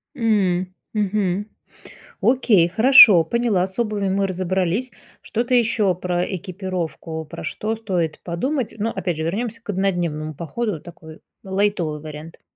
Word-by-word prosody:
М, 185 -6 +1 0.2
мгм. 205 -1 -1 0.7
Окей, 225 -9 +4
хорошо, 220 - +8
поняла, 215 -2 +1
с 190 +4 -13
обувью 210 -4 -1
мы 195 +1 +1
разобрались. 185 +5 -1 0.3
Что-то 240 +3 -2
еще 220 -5 +2
про 180 0 -1
экипировку, 175 -3 -5
про - - -9
что 220 +1 -3
стоит 180 -8 -2
подумать? 250 - -2
Но 220 +2 -1
опять 175 -7 -3
же, - - -2
вернемся 225 +6 -3
к - - -23
однодневному 175 -6 -1
походу, 170 +3 -3
такой 160 -2 -13 0.2
лайтовый 190 -6 -1
вариант. 155 +1 -10
190 Hz, 130 wpm, -21 LUFS, 170-215 Hz, 0.7 s, хорошо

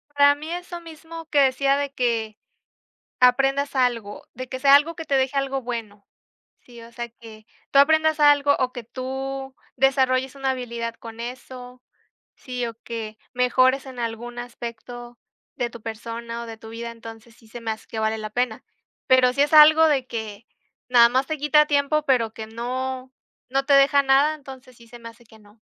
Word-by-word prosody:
Para 285 0 +5
mí 305 +3 -8
eso 350 0 -6
mismo 330 0 -10
que 295 - +2
decía 275 +1 +3
de 285 -1 -3
que, 230 -4 -1 0.8
aprendas 270 +3 +3
algo. 240 -5 -1
De 255 +1 -7
que 260 - -5
sea 275 0 +6
algo 295 +4 +4
que 325 - -7
te 280 -3 0
deje 265 +1 0
algo 270 -1 -1
bueno, 225 -4 -6 0.6
¿sí?, 240 -2 -14
o 230 +1 -13
sea, 235 0 -6
que 220 -2 -15 0.3
tú 275 - +5
aprendas 315 +1 +4
algo, 290 -1 +5
o 255 -1 0
que 245 - -8
tú 265 +2 -6 0.2
desarrolles 265 0 +1
una 270 -1 -1
habilidad 235 -2 -5
con 230 0 -11
eso, 250 +1 -9 0.5
¿sí? 250 -2 -5
O 230 - -6
que 220 -2 -6 0.2
mejores 255 +2 +2
en 260 -2 -10
algún 235 +1 -5
aspecto 240 0 -8 0.4
de 240 -2 -2
tu 235 - -11
persona 230 +1 -6
o - - -8
de 225 -1 -8
tu 220 - -12
vida, 235 +1 -6
entonces 225 0 -12
sí 225 - -21
se 240 +2 -9
me 230 -1 -4
hace 220 - -6
que 225 - -7
vale 220 0 0
la 215 0 -6
pena. 240 0 -2 0.4
Pero 255 -1 +5
si 280 +2 +2
es 290 - 0
algo 310 +1 +8
de 275 -5 +1
que, 220 -2 -7 0.4
nada 240 -2 +6
más 260 +3 0
te 310 +1 -3
quita 300 +1 +4
tiempo, 290 +1 +1
pero 245 -6 +1
que 220 -1 -8
no 255 +3 -5 0.4
no 270 +2 0
te 280 0 +3
deja 280 +1 +5
nada, 275 +3 +3
entonces 265 -3 -13
sí 235 0 -18
se 240 - -12
me 230 -1 -10
hace 230 +1 -17
que 220 -1 -19
no. 210 +1 -22
255 Hz, 190 wpm, -23 LUFS, 230-275 Hz, 0.8 s, algo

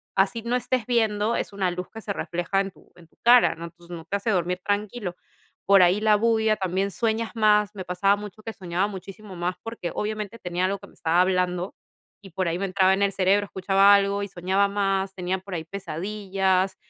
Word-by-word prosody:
así 195 +4 +1
no 240 +1 0
estés 250 -2 -1
viendo, 220 -2 +1
es - - -3
una 190 -2 0
luz 180 +1 -5
que 225 - -8
se 205 - -4
refleja 175 +2 -2
en 195 -1 -4
tu - - -23
en 170 -2 -17
tu - - -34
cara, 245 +1 +6
¿no? 165 +1 -7
Entonces 175 +1 -11
no 165 0 -9
te 200 - -3
hace 210 +2 -1
dormir 180 -1 0
tranquilo. 205 -2 -2 0.5
Por 195 -2 +6
ahí 185 +4 +3
la 215 -1 +5
bulla 220 0 +2
también 190 +1 -1
sueñas 225 +1 -1
más, 210 -1 +3
me 185 -2 -6
pasaba 195 +3 +2
mucho 210 0 -9
que 225 0 -6
soñaba 180 +2 -1
muchísimo 195 0 -9
más 175 +1 -2
porque, 225 -6 -5
obviamente, 215 +1 -4
tenía 180 +1 -1
algo 195 +1 -1
que 200 - -13
me - - -20
estaba 170 +1 +2
hablando 180 0 0 0.5
y 195 -3 -13
por 185 +1 -1
ahí 170 +1 -1
me 195 - -1
entraba 190 0 +3
en 200 - 0
el 200 - +2
cerebro, 195 +2 +2
escuchaba 195 +1 +4
algo 200 0 +2
y - - -3
soñaba 190 +2 +1
más, 195 -1 -1
tenía 185 0 -2
por 190 0 -10
ahí 160 -2 -3
pesadillas. 190 +1 -1
195 Hz, 215 wpm, -25 LUFS, 180-210 Hz, 0.5 s, cara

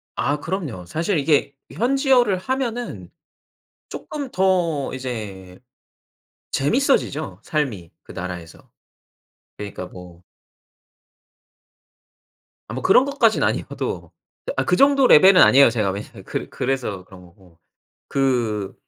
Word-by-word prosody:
아 145 +3 -1
그럼요. 150 - -5
사실 165 - -1
이게 145 -1 +1 0.2
현지어를 245 - +2
하면은 245 +3 -4 0.8
쪼끔 285 -3 -6
더 175 -6 +1
이제 105 -8 -7 0.9
재밌어지죠 155 - 0
삶이 120 - -3
그 - - -13
나라에서. 90 -2 -8 0.9
그러니까 100 -3 -7
뭐 90 -1 -13 2.5
아 - - -6
뭐 130 - -4
그런 250 +7 +5
것까진 275 -6 +2
아니어도 - - -3 0.5
아 - - +2
그 - - +2
정도 275 -1 +5
레벨은 185 +4 +7
아니에요 140 0 +7
제가. 110 -4 -1
왜냐하면 100 +2 -8
그 - - -5
그래서 125 -8 -3
그런 95 -1 -15
거고. 90 -2 -21 0.5
그 115 -7 0
135 Hz, 235 characters per minute, -21 LUFS, -, 2.5 s, 레벨은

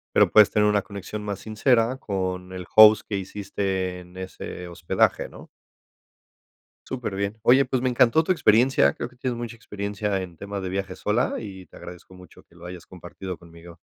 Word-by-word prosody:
Pero - - +5
puedes 105 -1 +7
tener 105 0 +3
una 105 -1 +2
conexión 100 +2 -7
más 100 -2 -4
sincera 115 +4 +1
con 95 -4 -4
el 90 -1 -7
host 110 0 +8
que 100 - -2
hiciste 95 -1 -3
en 90 +1 -14
ese 95 -1 -7
hospedaje, 85 -1 0
¿no? - - -13 1.4
Superbién. 100 -4 -4
Oye, 130 +5 +5
pues 130 -1 -1
me 130 - +1
encantó 125 +5 +4
tu 185 - 0
experiencia. 130 - +4
Creo - - -6
que 130 - -22
tienes 125 -1 -3
mucha 120 -1 -6
experiencia 100 -2 -3
en 85 -3 -9
tema 100 +1 -6
de 95 - -4
viajes 95 -1 -4
sola 110 +4 0
y 95 -4 -9
te - - -19
agradezco 90 +1 -12
mucho 90 -1 -16
que 85 - -26
lo 85 - -13
hayas 90 -1 -9
compartido 90 0 -8
conmigo. 85 0 -15
100 Hz, 180 wpm, -24 LUFS, 90-110 Hz, 1.4 s, host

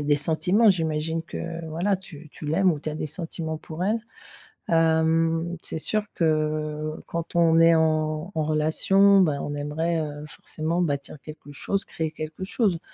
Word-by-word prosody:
a - - -5
des 145 - +4
sentiments, 180 +9 +3
j'imagine 160 -2 -1
que, 165 0 -6
voilà, 175 +6 0
tu 160 -5 -13
tu 150 - -9
l'aimes 180 +5 +3
ou 155 - -1
tu 155 - -4
as - - -5
des 155 - -3
sentiments 160 0 -5
pour 160 +2 -7
elle. 210 +5 +1 0.7
Hem, 165 +1 +2
c'est - - -4
sûr 215 +6 0
que 155 -1 0
quand 170 0 -5
on 165 -1 +5
est 165 0 +6
en 155 +1 +1
en 160 - 0
relation, 195 +6 +4
ben 150 -6 +2
on 145 - -4
aimerait, 160 +3 -1
heu, 150 -1 -5
forcément 160 +3 -3
bâtir 145 -3 -2
quelque 150 -1 -11
chose, 195 +7 -2
créer 160 -1 -3
quelque 155 +3 -6
chose. 195 -4 +1
160 Hz, 170 wpm, -25 LUFS, 155-170 Hz, 0.7 s, est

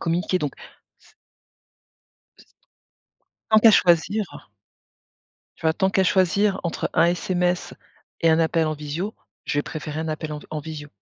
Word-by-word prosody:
communiquer. 175 +2 0
Donc 145 -5 -3 0.5
s - - -24 1.2
S - - -18 1.1
Tant 220 - +7
qu'à 225 - +8
choisir 200 +3 +3 1.3
tu - - -20
vois, 160 - +4
tant 190 +3 +1
qu'à 190 -1 +2
choisir 190 +2 +2
entre 170 - -2
un - - +5
SMS 180 +1 0 0.5
et 165 -1 +4
un 160 - +4
appel 165 0 +2
en 155 - -1
visio, 150 +8 -5 0.3
je 145 - -1
vais 145 - +1
préférer 155 -1 -5
un 160 - -4
appel 155 0 -4
en 150 - -5
v - - -14
en 155 -1 -3
visio. 150 -1 -8
165 Hz, 160 wpm, -23 LUFS, 155-185 Hz, 1.3 s, qu'à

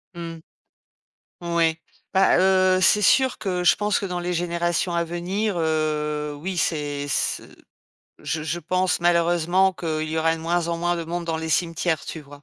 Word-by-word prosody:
Mmh. 170 -1 -6 1.1
Moui. 170 -2 +1 0.3
Bah, 190 -1 +4
heu, 185 0 +4
c'est 210 +2 +4
sûr 260 +5 +3
que 180 -3 -2
je 175 - +5
pense 210 -1 0
que - - -4
dans 180 -2 -3
les 175 0 -2
générations 175 0 -1
à 170 0 +1
venir, 185 +5 -2
heu, 150 -2 -1
oui, 180 +4 -5
c'est, 145 -4 -1
ce - - -1 0.8
je 155 -1 -3
je 160 +2 -2
pense, 185 +2 0
malheureusement, 175 +2 +3
qu’il 155 -3 -3
y 160 - -3
aura 160 0 +2
de 160 - -9
moins 170 +1 0
en 170 - -1
moins 175 0 0
de 170 - -3
monde 170 +1 -4
dans 165 -1 -2
les 160 0 -4
cimetières, 165 0 0
tu 160 - -6
vois? 145 0 -14
170 Hz, 180 wpm, -23 LUFS, 160-180 Hz, 1.1 s, je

